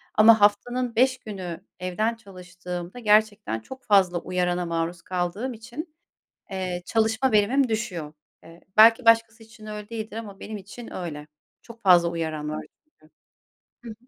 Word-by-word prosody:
ama 220 0 +7
haftanın 240 +4 +2
5 255 +2 +3
günü 190 -7 -7 0.2
evden 215 +6 -1
çalıştığımda 180 -1 -8
gerçekten 210 - +2
çok 260 - -11
fazla 185 -4 +3
uyarana 180 0 -1
maruz 170 0 -3
kaldığım 185 +9 -3
için, 265 +8 -9 0.6
eee, 185 -2 -3
çalışma 225 +3 +1
verimim 235 +5 +3
düşüyor. 185 -9 -3 0.3
Eee, 165 +1 -15 0.2
belki 225 +2 +7
başkası 230 0 +3
için 220 0 -15
öyle 210 -1 -7
değildir 220 -1 -6
ama 205 -4 -8
benim 215 -1 -6
için 205 +5 -11
öyle. 150 -5 -6 0.3
Çok 230 0 -14
fazla 175 -2 +6
uyaran 160 -3 -3
var 155 - -5 0.2
çünkü. 155 - -27 0.7
Hı 235 - -8
hı. - - -6
205 Hz, 145 wpm, -25 LUFS, 180-230 Hz, 0.7 s, ama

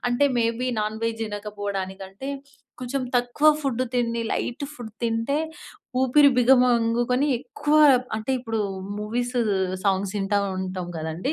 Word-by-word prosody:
అంటే 245 +4 +2
may 230 - +3 0.2
be 255 - 0
non veg 225 +2 -2
తినకపోవడానికి 205 -2 -5
అంటే, 265 +8 -8 0.5
కొంచెం 255 +2 -2
తక్కువ 245 +5 +1 0.2
ఫుడ్ 255 -2 0
తిండి, 235 -1 0
లైట్ 265 +4 -2
ఫుడ్ 225 -5 -9
తింటే, 230 +6 0 0.6
ఊపిరి 280 +3 +6
బిగమంగుకొని 250 +1 +3
ఎక్కువ 290 +4 -1 0.4
అంటే 220 +4 -4
ఇప్పుడు 225 -2 -3 0.4
మూవీస్, 240 +4 -2 0.5
సాంగ్స్ 195 -1 +1
ఇంటా 200 +1 +1 0.2
ఉంటాం 185 -1 -4
కదండీ. 160 - -3
235 Hz, 120 wpm, -24 LUFS, 205-255 Hz, 0.6 s, ఊపిరి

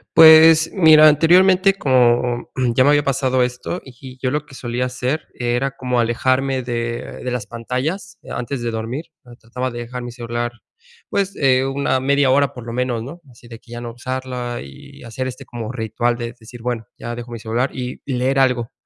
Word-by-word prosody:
Pues, 160 0 +8
mira, 155 -4 +7
anteriormente, 185 +5 +5
como 125 -5 +2 0.3
ya 130 - +5
me 140 - +4
había 145 0 +4
pasado 130 -2 +1
esto, 125 +8 -4
y 130 0 -12
yo 130 - 0
lo 150 +1 -2
que 140 - -15
solía 120 0 -3
hacer 125 +4 -3
era 120 +2 -1
como 125 -2 -2
alejarme 130 +3 +1
de 120 -1 -4
de 125 - -3
las 125 -4 -3
pantallas 130 - -4
antes 125 +1 -4
de 120 0 -2
dormir. 115 +7 -4 0.3
Trataba 125 +3 -4
de 120 - -6
dejar 125 +1 -6
mi 120 0 -6
celular, 120 0 -4 0.6
pues, 200 0 -1
eh, 130 -2 +3
una 135 -1 0
media 140 0 +2
hora 140 +1 +2
por 125 -2 -10
lo 115 - -6
menos, 125 -2 -1
¿no? 160 +8 -10
Así 120 -1 -17
de 115 -1 -11
que 120 - -20
ya 120 0 -6
no 120 -1 -6
usarla 125 0 -5
y 70 0 -14
hacer 120 +3 -5
este 130 +1 -8
como 120 -2 -6
ritual 120 0 -1
de 120 -1 -5
decir: 115 +1 -12
"Bueno, 120 -2 -3
ya 120 0 -6
dejo 120 0 -8
mi 115 - -6
celular", 115 +4 -1
y 125 0 -6
y 140 - -3
leer 130 +2 +1
algo. 125 -3 +1
125 Hz, 195 wpm, -20 LUFS, 120-135 Hz, 0.6 s, Pues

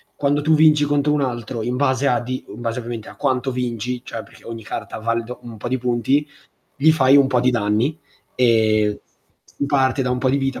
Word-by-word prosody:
quando 145 +1 +1
tu 155 +2 +3
vinci 150 -1 +5
contro 145 0 +1
un 150 - +2
altro, 120 -3 -3
in 120 +2 -2
base 130 0 +1
a 125 - +2
di 130 +1 -5
in - - -10
base 115 0 -2
ovviamente 115 -2 -6
a - - -14
quanto 130 -1 0
vinci, 125 0 -3
cioè 115 - -6
perché - - -19
ogni 115 -1 -7
carta 110 - -6
vale 115 +1 -1
do 125 +2 -9
un 115 -2 -10
po' 120 - -6
di 130 - 0
punti, 125 +4 +1 0.5
gli 155 +3 +5
fai 135 -3 +5
un 140 -1 +6
po' 125 -2 +1
di 125 - +3
danni. 120 +6 0 0.4
Ehm, 110 -3 +2 0.5
s - - -25
s - - +3
parte 135 -1 +2
da 125 - -1
un 125 - 0
po' 130 - +1
di 135 - +2
vita, 135 -1 -2
125 Hz, 230 wpm, -21 LUFS, 115-140 Hz, 0.5 s, un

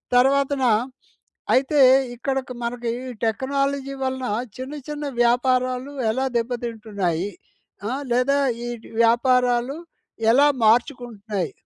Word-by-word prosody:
తర్వాతన 275 +2 +3 0.9
అయితే, 275 +3 +2 0.4
ఇక్కడ 265 +3 -2 0.3
మనకి 240 0 -3 0.2
ఈ - - -6
టెక్నాలజీ 275 +4 -1
వలన 260 0 -2 0.3
చిన్న, 260 +3 -6
చిన్న 295 0 -4 0.2
వ్యాపారాలు 255 +2 +1 0.2
ఎలా 260 +4 -1
దెబ్బతింటున్నాయి? 220 -7 -2 0.6
అ! - - -2 0.2
లేదా 250 +4 +2 0.3
ఈ - - -4 0.4
వ్యాపారాలు 245 +2 +2 0.6
ఎలా 280 +5 +5 0.2
మార్చుకుంటున్నాయి? 220 - 0
250 Hz, 95 wpm, -23 LUFS, 235-270 Hz, 0.9 s, ఎలా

